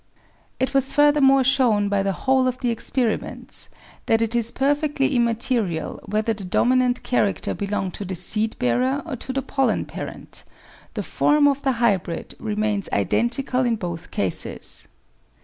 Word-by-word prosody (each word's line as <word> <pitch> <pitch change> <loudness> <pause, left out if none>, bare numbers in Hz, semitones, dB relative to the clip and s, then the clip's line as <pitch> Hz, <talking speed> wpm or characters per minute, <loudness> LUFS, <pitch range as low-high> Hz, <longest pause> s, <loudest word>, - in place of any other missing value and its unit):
It 260 +2 0
was 270 -1 +4
furthermore 290 -2 +5
shown 245 -6 +3
by 200 -1 +1
the 195 0 0
whole 260 +6 +1
of 255 0 -1
the 245 -2 -1
experiments 230 0 -2 0.4
that 225 - +3
it 225 0 0
is 235 -1 +2
perfectly 285 +1 0
immaterial 230 -7 0
whether 215 +2 0
the 205 -2 -8
dominant 250 +6 +2
character 205 -5 0
belongs 200 -2 -3
to 205 - -4
the 185 0 -4
seed 215 +5 0
bearer 255 - 0
or 310 -5 -4
to 260 - -4
the 270 0 -2
pollen 270 +1 0
parent; - - -7 0.5
the - - -2
form 295 0 +3
of 280 -1 +1
the 270 -2 +1
hybrid 200 -8 -1
remains 210 -2 -2
identical 240 - 0
in 240 -2 +1
both 175 -4 -6
cases. 95 -3 -1
235 Hz, 150 wpm, -23 LUFS, 205-265 Hz, 0.5 s, furthermore